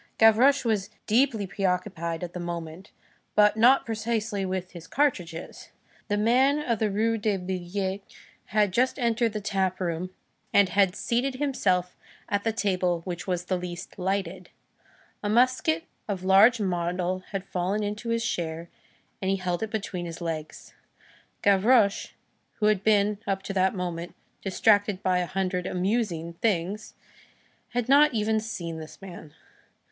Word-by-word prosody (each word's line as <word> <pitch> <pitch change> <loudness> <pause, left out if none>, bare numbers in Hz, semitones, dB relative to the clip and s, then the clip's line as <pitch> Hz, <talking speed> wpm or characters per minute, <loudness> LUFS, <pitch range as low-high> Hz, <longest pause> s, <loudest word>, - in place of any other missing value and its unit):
Gavroche 245 +5 +5
was 210 -3 0 0.2
deeply 230 -2 +2
preoccupied 180 -3 -2
at 175 -1 -6
that 180 - -5
moment, 170 +1 -6 0.5
but 210 0 +5
not 245 +5 +5
precisely 220 -2 -2
with 185 -1 -3
his 170 -2 -11
cartridges. 180 - -2 0.4
The 205 - 0
man 255 +7 +3
of 245 -8 -1
the 220 - +1
Rue 225 +3 +1
des 210 -1 0
Billettes 190 +2 -3 0.4
had 210 -1 +1
just 250 +7 +1
entered 235 -3 +1
the 215 - -2
tap 190 -2 -1
room 175 0 -2 0.4
and 200 -2 +5
had 190 +1 +3
seated 250 +5 -1
himself 190 -11 0 0.3
at 205 0 -1
the 225 - +1
table 185 -5 0
which 175 0 -6
was 180 -1 -1
the 185 0 -1
least 180 +2 -7
lighted. 190 +2 -2 0.7
A 205 - -2
musket 235 -8 +2 0.2
of 195 -3 -3
large 200 +6 +6
model 180 -1 -1
had 195 -2 -4
fallen 200 +3 -1
to 230 +3 -7
his 230 0 0
share, 165 0 -3 0.5
and 190 - -1
he 195 - +2
held 180 -2 -2
it 220 - -2
between 195 -5 -4
his 165 0 -7
legs. 160 -3 -6 0.7
Gavroche, 200 +1 +3 0.4
who 210 - -1
had 210 -2 +3
been, 210 -1 +3
up 195 0 -1
to 195 - -4
that 190 +1 +2
moment, 175 -2 -4 0.3
distracted 205 0 +2
by 185 -1 +2
a 180 - -1
hundred 185 -1 -2
"amusing" 180 -3 -1
things, 205 0 -1 0.7
had 245 -1 -2
not 285 0 +5
even 220 0 +1
seen 170 -7 -5
this 155 -1 -10
man. 175 -6 -11
195 Hz, 150 wpm, -26 LUFS, 180-220 Hz, 0.7 s, large